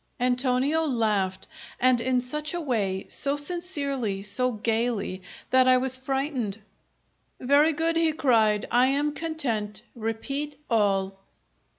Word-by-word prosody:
Antonio 255 +5 +1
laughed, 210 -9 0 0.3
and 250 -1 +3
in 255 0 +1
such 300 +6 -3
a - - -2
way, 205 - -1
so 280 0 +1
sincerely, 280 - -1
so 250 +5 0
gaily, 220 -3 -1 0.3
that 255 0 +5
I 255 0 +6
was 260 0 +1
frightened. 260 -5 -2 0.8
"Very 285 +5 +4
good!" 325 +2 0
he 330 -1 +3
cried. 225 -8 +2
"I 245 +2 +4
am 290 +2 0
content. 250 -11 -3
Repeat 275 +6 -4 0.2
all." 195 -3 +1
255 Hz, 120 wpm, -26 LUFS, 220-285 Hz, 0.8 s, I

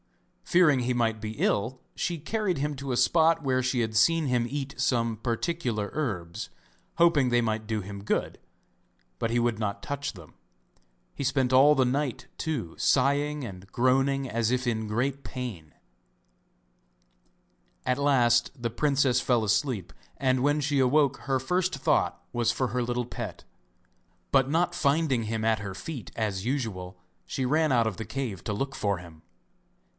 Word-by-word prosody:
Fearing 155 -7 +4
he 125 +1 0
might 115 -3 0
be 110 0 -5
ill 120 +5 0 0.2
she 175 -1 -2
carried 190 +3 -1
him 145 +1 -1
to 140 0 -5
a 125 - 0
spot 165 +2 +4
where 130 -2 +1
she 130 0 0
had 110 -2 -1
seen 160 +9 +4
him 125 -3 +1
eat 140 -1 -4
some 120 -4 +1
particular 115 -1 -2
herbs, 105 - -3 0.5
hoping 165 -6 +4
they 120 0 +3
might 110 -2 -1
do 110 -1 -1
him 100 0 -7
good, - - -1 0.8
but 115 - -1
he 120 - +2
would 120 -2 0
not 100 -2 -3
touch 145 0 -3
them. 85 -6 -14 0.8
He - - -5
spent 135 -1 +1
all 140 +3 +7
the 130 -2 +3
night, 135 0 -1
too, 130 - -3
sighing 145 +2 +2
and 95 -2 -10
groaning 135 +2 +2
as 115 0 0
if 125 0 0
in 110 -2 -1
great 130 +6 -1
pain. 105 - -6 2.1
At 125 +2 +1
last 120 -4 +3
the 120 -1 -2
princess 135 -1 +2
fell 120 -3 +2
asleep, 105 - 0 0.2
and 130 -1 +1
when 145 +1 +3
she 145 -1 +1
awoke 140 +1 +3
her 135 -1 +2
first 180 +6 0
thought 135 - +1
was 120 -1 +2
for 125 +1 -1
her 125 +3 -1
little 120 0 -1
pet, 115 -6 -7 0.9
but 135 -1 +4
not 175 +3 +1
finding 140 -6 +1
him 110 0 -2
at 110 -1 +2
her 100 -2 -6
feet 135 +3 -7
as 105 -4 -1
usual, 105 -8 -3 0.3
she 130 - -2
ran 155 +3 +2
out 120 -3 +3
of 110 - -2
the 110 - -5
cave 110 -5 -4
to - - -2
look 135 +6 -3
for 100 -2 0
him. 85 -3 -13
125 Hz, 165 wpm, -27 LUFS, 110-140 Hz, 2.1 s, all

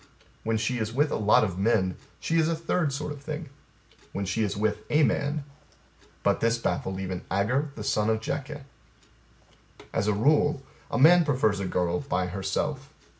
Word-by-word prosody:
When 110 0 0
she 120 +3 -1
is 110 0 -2
with 145 +5 +1
a - - 0
lot 105 0 +4
of 95 -3 -2
men, 95 -3 +2 0.2
she 165 0 +1
is 160 0 +3
a 165 - +1
third 165 -1 0
sort 150 +2 -3
of 145 -1 -8
thing. 155 0 -6 0.6
When 100 - -2
she 110 +4 -1
is 105 -2 -1
with 105 0 0
a 150 +1 +4
man... 145 +1 0 0.8
But - - +2
this 115 +1 +2
baffled 95 -4 -2
even 95 -1 -4
Agur 125 +10 +1
the 105 - -6
son 105 +1 +1
of 110 0 +2
Jakeh. 145 +5 -4 1.3
As 105 - 0
a 105 - +3
rule, 145 +5 +2 0.3
a - - -1
man 170 +7 +7
prefers 125 -9 +1
a 95 - -2
girl 90 -1 0
by 90 0 -1
herself. 100 +10 -3
115 Hz, 180 wpm, -27 LUFS, 100-145 Hz, 1.3 s, man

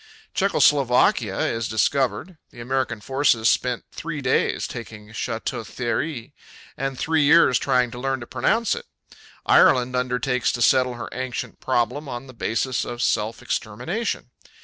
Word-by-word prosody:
Czecho - - +1
Slovakia 125 -7 +3
is 115 0 -1
discovered. 140 - 0
The - - -15
American 120 -2 -2
forces 130 -3 +2
spent 125 -2 0
three 165 -2 -5
days 130 -2 +1
taking 105 -3 -8
Château 110 - -4
Thierry 125 +2 -3 0.4
and 135 -1 -3
three 160 +2 +1
years 145 -3 +5
trying 125 -1 +1
to 120 - -8
learn 135 +1 -1
to - - -6
pronounce 225 - +1
it. - - -6 0.6
Ireland 125 0 +4
undertakes 125 0 0
to 120 - -3
settle 125 -1 +3
her 115 -1 -7
ancient 130 -1 -5
problem 130 +3 -1
on 120 +1 -6
the 130 - -12
basis 120 +2 -1
of 120 0 -4
self 110 +1 0
extermination. 125 - -3
125 Hz, 145 wpm, -23 LUFS, 120-135 Hz, 0.6 s, years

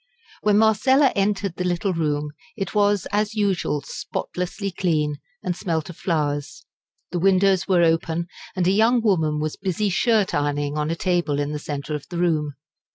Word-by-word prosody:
When 210 -1 +3
Marcella 255 +6 +4
entered 195 -2 0
the 180 - -1
little 180 +2 0
room 150 -2 -1 0.3
it 195 -3 -3
was 205 -2 +2
as 210 +1 0
usual 190 -8 0
spotlessly 180 +7 -4
clean 155 -5 0 0.3
and 180 -1 -1
smelt 165 -4 -2
of 165 - -15
flowers. 145 -4 -2 0.5
The 175 - -1
windows 190 0 +3
were 180 -3 +4
open, 165 0 +1 0.3
and 185 -2 0
a 185 - +4
young 225 +4 +3
woman 160 -8 +2
was 155 0 -3
busy 195 +2 -1
shirt 215 +1 +2
ironing 145 0 -1
on 150 0 -1
a 165 - 0
table 175 -5 0
in 145 0 -1
the 150 - -3
centre 145 0 -5
of 150 -1 -5
the 175 - -5
room. 155 -5 0
175 Hz, 170 wpm, -23 LUFS, 150-200 Hz, 0.5 s, Marcella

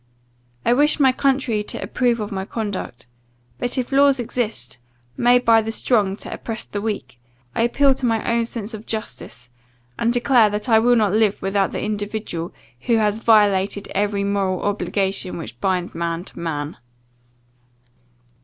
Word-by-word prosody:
I 235 - +4
wish 295 +4 +3
my 265 -2 +5
country 260 -5 +1
to 210 - -5
approve 240 -2 0
of 210 -1 -4
my 190 -1 -3
conduct; 200 - -5 0.5
but, 245 - -2
if 255 0 -2
laws 275 -1 +4
exist, 220 - -3 0.4
made 245 +1 +3
by 225 -1 +6
the 220 +1 -4
strong 210 -4 +1
to - - -7
oppress 225 -1 -5
the 205 - -5
weak, 165 - -4 0.3
I - - 0
appeal 270 +4 +3
to 255 -1 -2
my 225 -1 0
own 235 0 +1
sense 230 -1 -5
of 220 0 -9
justice, 125 - -5 0.5
and 235 - +2
declare 245 -2 +4
that 210 +2 -2
I 225 -2 +5
will 245 +2 +4
not 210 -4 +2
live 215 -2 +2
with 195 0 -3
the 195 -2 +1
individual, 205 -5 -3 0.4
who 235 - +4
has 210 0 +1
violated 205 -3 +3
every 200 0 0
moral 195 -2 -1
obligation 195 -1 -1
which 125 -8 -9
binds 185 -2 0
man 170 0 -3
to - - -12
man. 150 -3 -4
210 Hz, 165 wpm, -21 LUFS, 195-235 Hz, 0.5 s, by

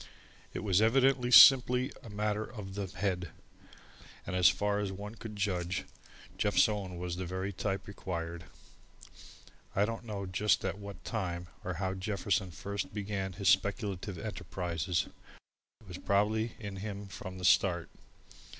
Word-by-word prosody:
It - - -4
was 100 -1 +3
evidently 130 +2 +4
simply 125 +1 +8
a 115 - -11
matter 105 +1 -1
of 105 -4 -8
the 100 -1 -3
head, 90 -2 -2 1.0
and - - -3
as 90 -1 +7
far 105 0 0
as 100 -2 -2
one 105 +2 -7
could 110 -2 -8
judge, 90 -6 -1 0.5
Jeff's - - +4
own 100 -4 -4
was 90 0 -4
the 95 - -3
very 95 +2 -3
type 95 0 -2
required. 85 -4 -5 1.3
I 100 - +4
don't 115 +2 -4
know 100 -3 -4
just 100 +3 +1
at 100 - -2
what 100 -1 -9
time 90 -5 -3
or 90 -1 -3
how 95 +1 -1
Jefferson 95 -1 -1
first 100 +4 -4
began 100 -2 -3
his 95 +2 +1
speculative 100 -1 +1
enterprises. 90 -4 -2 0.8
It 110 - -18
was 90 -1 -7
probably 110 +3 +1
in 100 -3 -6
him 100 0 -5
from 95 0 -8
the 90 - -4
start. 90 -2 +4
100 Hz, 150 wpm, -32 LUFS, 90-105 Hz, 1.3 s, simply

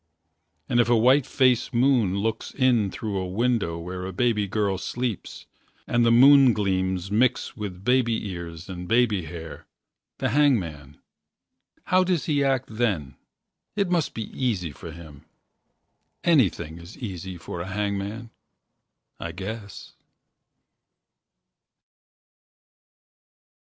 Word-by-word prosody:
And 120 - +1
if 120 - +3
a 120 - +5
white 130 +4 +4
face 130 -3 +2
moon 120 -6 +2
looks 110 +2 -2
In 125 -6 +3
through 100 0 -4
a 95 - -3
window 110 -3 0
where 90 +2 -6
a - - -5
baby 105 0 +1
girl 100 -2 -1
Sleeps 120 -3 -4 0.4
and 120 0 +2
the 115 - +4
moon 135 +1 +7
gleams 95 -2 -1
mix 120 +4 +1
with 100 -5 -7
Baby 120 -4 +2
ears 85 -2 -7
and 90 -2 -7
baby 110 -6 +2
hair 80 -1 -9 0.5
the - - -1
hangman 90 - +1 0.9
How 185 0 +3
does 180 -4 0
he 145 -3 +1
act 135 -2 +1
then? 95 - 0 0.6
It 200 -4 0
must 170 -4 0
be 115 - -3
easy 100 - -1
For 80 - -10
him. 80 -2 -13 1.0
Anything 95 - +2
is 85 +5 -12
easy 95 -6 -6
for 85 +1 -7
a 90 - -5
hangman, 100 +3 -3 0.9
I 85 -1 -5
guess. 100 +3 -7
105 Hz, 120 wpm, -25 LUFS, 90-125 Hz, 1.0 s, moon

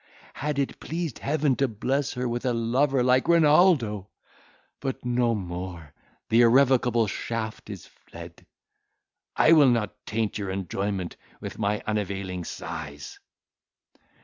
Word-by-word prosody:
Had 150 0 -3
it 140 -1 -2
pleased 165 -4 -4
Heaven 145 -2 +1
to 135 - +2
bless 130 +5 -1
her 125 -1 -2
with 120 0 -3
a 125 -2 +1
lover 125 +3 +1
like 125 +1 +3
Renaldo! 150 - +4 0.7
but 135 -3 -4
no 120 -1 +1
more, 90 -5 -6 0.4
the 115 +2 +5
irrevocable 125 -1 +4
shaft 110 +2 -5
is - - -8
fled. - - -13 0.9
I - - +5
will 150 -5 +7
not 105 -3 -1
taint 110 -1 -2
your 100 -2 -4
enjoyment 95 0 -3 0.2
with - - -8
my 105 0 -1
unavailing 100 -4 -3
sighs!" 70 -2 -7
115 Hz, 125 wpm, -26 LUFS, 100-135 Hz, 0.9 s, will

